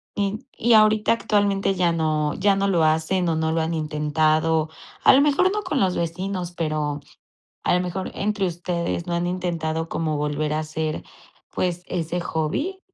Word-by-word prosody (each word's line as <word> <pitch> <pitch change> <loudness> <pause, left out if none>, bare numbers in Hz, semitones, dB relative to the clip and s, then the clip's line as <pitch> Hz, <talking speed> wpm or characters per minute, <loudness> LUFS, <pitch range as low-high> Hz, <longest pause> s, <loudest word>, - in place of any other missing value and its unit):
Y 205 +3 -2
y 235 +1 +3
ahorita, 215 0 +5
actualmente, 200 -3 +1
ya 175 -2 +2
no 155 -2 0
ya 200 +1 +3
no 200 0 +1
lo 175 -4 +2
hacen, 160 +3 +1
o, 160 - +1
no 160 0 0
lo 165 - +1
han 160 +1 -1
intentado, 155 +1 +1 0.3
a - - +8
lo 275 - +6
mejor 295 +6 +3
no 420 -1 -2
con 305 -7 -1
los 185 -4 +2
vecinos, 180 +2 -3
pero 155 -3 -2 0.6
a - - +2
lo - - +2
mejor 185 +1 -4
entre 205 -1 0
ustedes, 170 0 -3
¿no 175 - -2
han 175 +1 0
intentado 165 -3 -2
como 155 -2 -1
volver 150 +1 -1
a 155 - 0
hacer, 155 0 -3 0.5
pues, 180 -1 -2
ese 175 0 -2
hobby? 230 - -2
170 Hz, 175 wpm, -23 LUFS, 155-195 Hz, 0.6 s, a